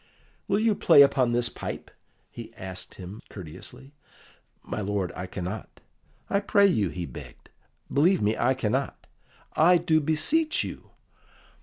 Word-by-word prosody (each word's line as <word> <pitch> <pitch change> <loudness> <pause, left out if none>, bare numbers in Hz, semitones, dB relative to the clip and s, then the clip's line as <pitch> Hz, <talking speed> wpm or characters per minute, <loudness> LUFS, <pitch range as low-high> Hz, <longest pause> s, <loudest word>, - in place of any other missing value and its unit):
"Will - - +2
you 220 0 +3
play 165 -7 +7
upon 130 -3 +2
this 120 0 +2
pipe?" - - -7 0.4
he - - -9
asked 95 -1 -7
him 95 +3 -9
courteously. 105 - -10 0.7
"My - - -4
lord, 100 -3 -2
I 90 - -5
cannot." 95 +3 -6 0.5
"I 200 - +1
pray 200 0 +3
you," 110 - +2
he 90 0 -5
begged. 65 - -12 0.4
"Believe 175 +6 +4
me, 105 +2 +2
I 130 +2 +2
cannot." 130 +3 -2 0.5
"I 175 +3 +6
do 160 -2 +2
beseech 160 - +1
you." - - -8
130 Hz, 140 wpm, -26 LUFS, -, 0.7 s, play